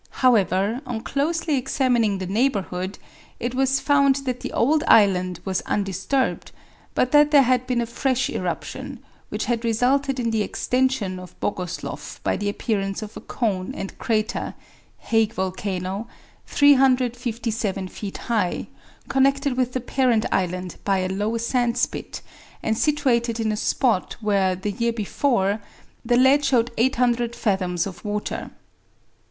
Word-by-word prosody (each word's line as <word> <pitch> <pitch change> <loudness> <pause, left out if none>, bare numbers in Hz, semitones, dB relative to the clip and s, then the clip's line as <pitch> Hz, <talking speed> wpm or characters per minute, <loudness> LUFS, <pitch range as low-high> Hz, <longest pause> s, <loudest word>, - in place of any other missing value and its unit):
However, 210 0 +3
on 230 -3 -3
closely 305 +3 0
examining 245 -5 +1
the 190 - -4
neighborhood, 195 -3 -1 0.4
it 240 +1 -2
was 270 +1 +2
found 280 -1 +4
that 255 -1 -2
the - - -5
old 295 +6 +2
island 185 -4 +4
was 190 -1 -1
undisturbed, 205 +7 -1 0.4
but 255 - +2
that 295 0 +6
there 290 -2 +6
had 255 0 +1
been 250 -2 +1
a - - -1
fresh 255 +2 0
eruption, - - -4 0.3
which - - -3
had 235 -1 -1
resulted 260 +4 +1
in 230 -2 0
the 220 -1 +1
extension 250 -5 0
of 180 -1 -12
Bogosloff 180 -4 -4
by - - +1
the 205 0 -1
appearance 200 -1 -2
of 210 - -9
a - - -7
cone 195 -6 -2
and 195 - -6
crater 220 -1 -1 0.4
(Hague 225 -1 +1
Volcano), 190 +2 -3 0.4
357 245 -7 +2
feet 195 +1 -7
high, 215 -7 0 0.4
connected 275 0 +2
with 250 -1 0
the 255 - -1
parent 245 -3 +1
island 180 -1 -1
by 195 -1 +2
a 185 0 -1
low 205 +4 -1
sand 235 +1 0
spit, 245 - -3 0.4
and 220 - +1
situated 240 -4 +1
in 220 -1 0
a - - -1
spot 220 -2 +1
where, 200 -4 +1
the 190 +3 -3
year 235 +3 -1
before, 215 -2 0 0.4
the 240 +1 +2
lead 265 +3 +5
showed 245 -4 +2
800 240 -1 +1
fathoms 185 -5 0
of 190 -3 -8
water. 210 -1 -3
230 Hz, 145 wpm, -23 LUFS, 195-255 Hz, 0.4 s, that